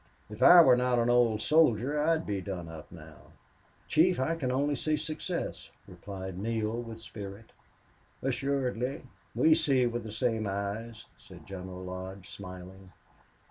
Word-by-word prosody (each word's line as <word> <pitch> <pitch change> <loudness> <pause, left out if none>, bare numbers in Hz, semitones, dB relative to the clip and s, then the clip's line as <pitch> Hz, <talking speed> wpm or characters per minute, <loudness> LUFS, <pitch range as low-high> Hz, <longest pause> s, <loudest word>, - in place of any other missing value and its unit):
If 105 - -9
I 175 0 +10
were 130 -4 +6
not 125 0 +1
an 120 0 +2
old 115 -3 +3
soldier, 150 -2 +3
I 165 +2 +3
would 160 - -4
be 100 -2 -2
done 90 -3 -5
up 80 -1 -10
now." 80 -2 -14 0.5
"Chief, 170 +2 +3
I 160 +6 0
can 140 -6 -2
see - - 0
only 145 +2 +1
success," 155 +4 -3 0.2
replied 95 -2 -8
Neale, 110 +2 -2
with 115 -1 -8
spirit. 105 0 -9 0.7
"Assuredly. 135 -1 -1 0.3
We 160 - +5
see 140 -6 +2
with 120 0 -2
the 110 - -7
same 110 -1 -1
eyes," 100 +3 -4
said - - -14
General 95 -1 -8
Lodge, 95 +1 -7
smiling. 95 0 -10
115 Hz, 150 wpm, -30 LUFS, 95-135 Hz, 0.7 s, I